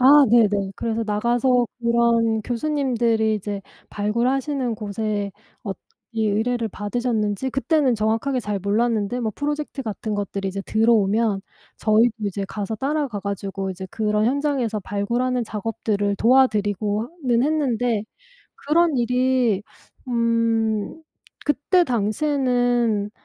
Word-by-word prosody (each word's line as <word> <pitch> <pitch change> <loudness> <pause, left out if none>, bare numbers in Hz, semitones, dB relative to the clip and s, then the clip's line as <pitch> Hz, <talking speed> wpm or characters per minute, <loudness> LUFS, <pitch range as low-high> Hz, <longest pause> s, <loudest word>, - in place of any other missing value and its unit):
아. 255 - +5 0.2
네네. 205 -4 +3
그래서 230 0 -2
나가서 240 +4 +2
그런 235 -1 +2
교수님들이 240 -4 0
이제 205 0 -4 0.3
발굴하시는 245 +4 0
곳에 205 -1 -3 0.3
엇 195 -4 -4 0.4
이 220 -1 +1
의뢰를 225 +2 0
받으셨는지 215 +2 -2
그때는 270 -1 +2
정확하게 225 +5 0
잘 210 -4 -3
몰랐는데 220 +3 0
뭐 220 -3 -2
프로젝트 290 -1 -3
같은 215 -1 -4
것들이 200 -1 -3
이제 195 +1 -3
들어오면 220 -2 +2 0.4
저희도 220 +2 +4 0.2
이제 200 0 -3
가서 210 +1 -4
따라가 275 -3 -1
가지고 195 -1 -4
이제 190 0 -6
그런 210 -1 0
현장에서 265 -4 0
발굴하는 235 +6 -1
작업들을 210 -2 -2
도와드리고 210 -3 +2
어 235 - -7 0.2
는 240 -1 +3
했는데 245 -7 0 0.5
그런 320 0 +2
일이 250 -3 +2 0.5
음 230 0 0 0.5
그때 295 +6 +3
당시에는 245 -3 +1
230 Hz, 290 characters per minute, -22 LUFS, 210-250 Hz, 0.5 s, 아